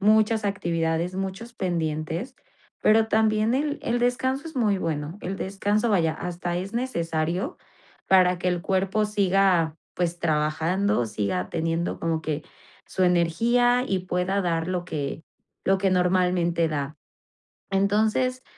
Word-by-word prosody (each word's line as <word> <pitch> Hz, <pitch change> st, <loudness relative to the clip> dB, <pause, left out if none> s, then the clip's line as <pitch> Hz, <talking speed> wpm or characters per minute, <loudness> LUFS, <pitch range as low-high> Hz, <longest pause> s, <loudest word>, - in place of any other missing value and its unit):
muchas 215 Hz, +1 st, +3 dB
actividades, 170 Hz, -3 st, -1 dB
muchos 195 Hz, +5 st, -5 dB
pendientes, 165 Hz, -, -2 dB, 0.5 s
pero 220 Hz, +1 st, +4 dB
también 220 Hz, +1 st, +2 dB
el 290 Hz, +1 st, -1 dB
el 240 Hz, +1 st, 0 dB
descanso 260 Hz, +5 st, 0 dB
es 310 Hz, -, -12 dB
muy 210 Hz, -5 st, +2 dB
bueno, 155 Hz, 0 st, -3 dB
el 190 Hz, +2 st, -4 dB
descanso 205 Hz, +4 st, 0 dB
vaya 165 Hz, -5 st, +2 dB
hasta 175 Hz, +1 st, -4 dB
es 190 Hz, +3 st, -4 dB
necesario 175 Hz, -, -2 dB, 0.5 s
para 180 Hz, -1 st, +5 dB
que 180 Hz, -, 0 dB
el 175 Hz, -1 st, -1 dB
cuerpo 195 Hz, +3 st, +1 dB
siga 195 Hz, -5 st, +2 dB, 0.2 s
pues 175 Hz, -1 st, -1 dB
trabajando, 160 Hz, -, +1 dB
siga 100 Hz, -4 st, -2 dB
teniendo 165 Hz, +1 st, -1 dB
como 165 Hz, -1 st, 0 dB
que 155 Hz, -1 st, -3 dB, 0.4 s
su 185 Hz, -, 0 dB
energía 235 Hz, +9 st, +3 dB
y 190 Hz, -1 st, 0 dB
pueda 185 Hz, +2 st, -1 dB
dar 165 Hz, -2 st, 0 dB
lo 180 Hz, -1 st, -2 dB
que 150 Hz, -2 st, -4 dB, 0.4 s
lo 195 Hz, 0 st, +3 dB
que 190 Hz, 0 st, +1 dB
normalmente 180 Hz, -2 st, +2 dB
da. 145 Hz, 0 st, -3 dB, 0.8 s
Entonces 215 Hz, +6 st, +1 dB
185 Hz, 130 wpm, -25 LUFS, 165-215 Hz, 0.8 s, para